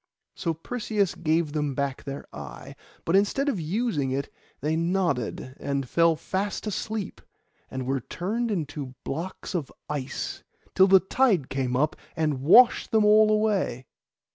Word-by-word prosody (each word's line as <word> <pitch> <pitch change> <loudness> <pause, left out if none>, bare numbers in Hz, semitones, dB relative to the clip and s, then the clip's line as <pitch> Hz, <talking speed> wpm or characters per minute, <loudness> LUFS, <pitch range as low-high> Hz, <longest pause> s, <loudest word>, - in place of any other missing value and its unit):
So 165 -2 -2
Perseus 210 +2 -1
gave 160 -2 0
them 150 -3 -1
back 140 -1 -2
their 140 0 -6
eye; - - -9 0.3
but 165 - +2
instead 205 +8 +2
of 270 -10 0
using 165 - -1
it, 135 +1 -3 0.3
they 155 +3 0
nodded 165 - -1
and 140 -2 -2
fell 165 +4 +3
fast 195 +7 -3
asleep, 215 -1 -4 0.5
and 130 -1 -4
were 135 +1 0
turned 220 - -2
into 145 -8 -4
blocks 170 +8 -5
of 165 -7 -3 0.2
ice, 140 -3 -4 0.3
till 190 - +6
the 190 -1 +7
tide 190 - +2
came 130 -2 -1
up 150 +4 +1 0.2
and 155 -5 0
washed 235 - +6
them 220 -1 +3
all 215 +1 +6
away. 210 - +1
165 Hz, 145 wpm, -26 LUFS, 140-205 Hz, 0.5 s, the